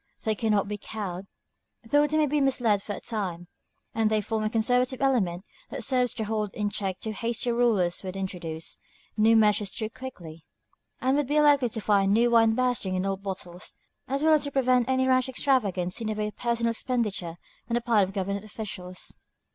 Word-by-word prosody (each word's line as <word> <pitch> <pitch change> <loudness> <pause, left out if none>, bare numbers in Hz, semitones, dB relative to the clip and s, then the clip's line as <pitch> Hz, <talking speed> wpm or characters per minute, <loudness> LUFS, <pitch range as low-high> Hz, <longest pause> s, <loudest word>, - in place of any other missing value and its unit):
They 220 - +2
cannot 210 -2 +1
be 205 0 -4
cowed, 195 -3 -6 0.6
though 290 +6 +3
they 310 +2 0
may 310 - +4
be 295 0 +1
misled 245 -7 +2
for 205 - -5
a - - -6
time, 185 -6 -4 0.5
and 220 -1 +2
they 215 0 +2
form 215 +1 -2
a 215 - 0
conservative 245 +3 +1
element 210 -10 +1 0.2
that - - -4
serves 250 -3 +2
to 220 - -2
hold 215 -1 -2
in 205 -1 -1
check 190 -3 -2
too 220 - -4
hasty 235 +3 -1
rulers 220 -8 +2
who 190 - -9
would 185 - -5
introduce 175 -4 -5 0.4
new 220 +1 +5
measures 210 -2 +3
too 220 -2 -3
quickly, 170 -13 -9 0.6
and 260 +2 +2
would 290 -3 0
be 295 +2 +2
likely 285 -4 +4
to 220 - -4
find 200 -1 +3
the - - +4
new 240 0 +3
wine 225 -1 +5
bursting 240 -7 0
the 190 - -1
old 195 0 -2
bottles, 185 -3 -6 0.3
as 275 +2 -1
well 315 0 +5
as 300 -2 +4
to - - -2
prevent 255 -2 +2
any 260 0 +2
rash 255 0 +3
extravagance 215 -9 0
in 225 - -2
the 215 - 0
way 210 0 -1
of - - -15
personal 235 -1 0
expenditure 215 -8 -2 0.3
on 235 - 0
the 240 - +1
part 230 -4 +3
of 190 - -2
government 200 0 -3
officials. 190 -4 -6
220 Hz, 205 wpm, -27 LUFS, 195-250 Hz, 0.6 s, new